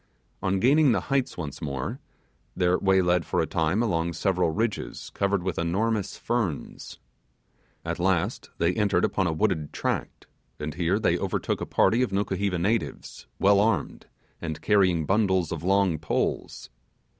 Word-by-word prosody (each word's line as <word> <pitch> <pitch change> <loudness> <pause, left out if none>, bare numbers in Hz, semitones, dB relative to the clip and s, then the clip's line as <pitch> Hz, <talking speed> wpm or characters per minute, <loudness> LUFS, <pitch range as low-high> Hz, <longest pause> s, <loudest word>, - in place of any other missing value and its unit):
On 95 0 0
gaining 140 +3 +4
the - - +2
heights 135 -2 0
once 75 -6 -6
more, 70 -3 -4 0.6
their 90 0 +2
way 95 -1 +3
led 90 -1 +2
for - - -1
a - - +2
time 80 +8 0
along 85 -6 0
several 90 0 +1
ridges 110 +6 -3
covered 100 -2 0
with 95 -2 -2
enormous 100 +5 -1
ferns. 115 -11 -3 0.9
At - - -3
last 90 -2 0
they 85 +2 +2
entered 100 -4 +2
upon 95 -3 0
a - - +1
wooded 80 -3 0
tract, - - -3 0.3
and 75 0 -4
here 85 0 +1
they - - +1
overtook - - -2
a - - -3
party 115 +3 +3
of 125 - 0
Nukuheva 95 -1 -1
natives, 105 +7 -2
well 100 0 +4
armed, 105 -6 0 0.3
and 80 -3 -4
carrying 90 -6 +2
bundles 95 -3 +1
of 85 - -4
long 95 -3 +2
poles. 75 - -2
95 Hz, 155 wpm, -26 LUFS, 85-105 Hz, 0.9 s, gaining